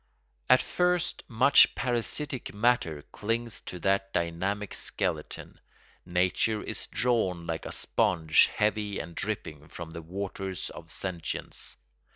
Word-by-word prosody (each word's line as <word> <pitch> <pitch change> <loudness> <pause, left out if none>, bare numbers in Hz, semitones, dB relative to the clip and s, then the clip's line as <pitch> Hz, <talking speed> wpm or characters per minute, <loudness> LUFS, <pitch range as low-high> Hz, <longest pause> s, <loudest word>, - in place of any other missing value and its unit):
At 130 - +7
first 180 -1 +1
much 130 +4 +6
parasitic 125 +1 -1
matter 105 -10 +2
clings 115 +2 -2
to 90 - -5
that 95 +1 +1
dynamic 95 +5 -1
skeleton. - - -3 0.5
Nature 90 +5 +1
is - - -6
drawn 110 -8 +1
like 80 -1 -3
a - - -6
sponge 80 -3 +3
heavy 105 -1 0
and 85 - -5
dripping 80 -8 -4
from 85 -1 -8
the 85 - -7
waters 95 +1 -4
of 85 -1 -11
sentience. 85 0 -4
95 Hz, 120 wpm, -29 LUFS, 85-115 Hz, 0.5 s, At